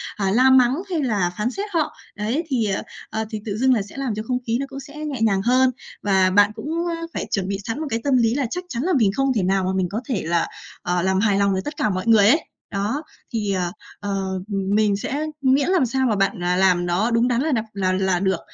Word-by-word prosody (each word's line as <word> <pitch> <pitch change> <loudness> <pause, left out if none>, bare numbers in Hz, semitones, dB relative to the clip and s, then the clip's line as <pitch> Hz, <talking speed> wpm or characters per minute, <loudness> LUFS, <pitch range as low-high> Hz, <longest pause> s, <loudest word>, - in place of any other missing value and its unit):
à, 195 -2 0
la 255 +5 +5
mắng, 260 0 +5
hay 340 -4 0
là 205 -8 +1
phán 215 +4 0
xét 395 +8 -4
họ. 320 -3 0 0.2
Đấy, 225 +10 -1
thì, 255 -7 0
à, 195 -2 -1 0.3
à, 220 0 -2
thì 215 -2 -5
tự 210 -2 -3
dưng 260 +2 +4
là 225 - +1
sẽ 200 +6 -10
làm 265 -6 -2
cho 215 - -4
không 250 - +1
khí 230 +1 +1
nó 275 - -2
cũng 275 - -7
sẽ 285 +2 -11
nhẹ 300 -5 -4
nhàng 200 -4 +3
hơn. 255 +4 +3 0.3
Và 190 -2 +3
bạn 205 +2 +5
cũng 220 +6 -7 0.5
phải - - -3
chuẩn 195 -2 0
bị 200 0 -2
sẵn 225 +7 -4
một 315 - -3
cái 225 - -1
tâm 275 -3 +3
lý 230 -2 +3
là 275 0 0
chắc 360 +1 -3
chắn 235 -3 -3
là 365 +3 +1
mình 220 - +4
không 270 0 +2
thể 205 - +1
nào 190 +1 +1
mà 185 - 0
mình 190 -1 +1
có 210 +5 -3
thể 230 -8 -1
là, 170 +1 +1 0.4
à, 175 0 0
làm 190 +1 +1
hài 205 -1 +2
lòng 200 -1 +2
được 190 - -1
tất 295 -1 -5
cả 215 - +1
mọi 185 +2 -3
người 215 -3 +6
ấy. 305 +9 +4 0.3
Đó, 210 +10 -2 0.3
thì, 210 -3 0
à, 180 -2 -1 0.3
ờ, 200 -1 -2 0.3
mình 200 +1 +1
sẽ 285 +9 -3 0.2
miễn 270 +3 +3
làm 370 -8 +3
sao 265 +2 0
mà 215 - +2
bạn, 195 -2 0
à, 180 0 +1
làm 180 -1 +3
nó 185 +7 +1
đúng 230 +1 +3
đắn 245 0 +1
là 310 +2 0
đặt 225 -4 0
là 190 -2 0
là 185 - 0
là 185 -2 +2
được. 190 -2 +1
220 Hz, 270 wpm, -22 LUFS, 195-260 Hz, 0.5 s, người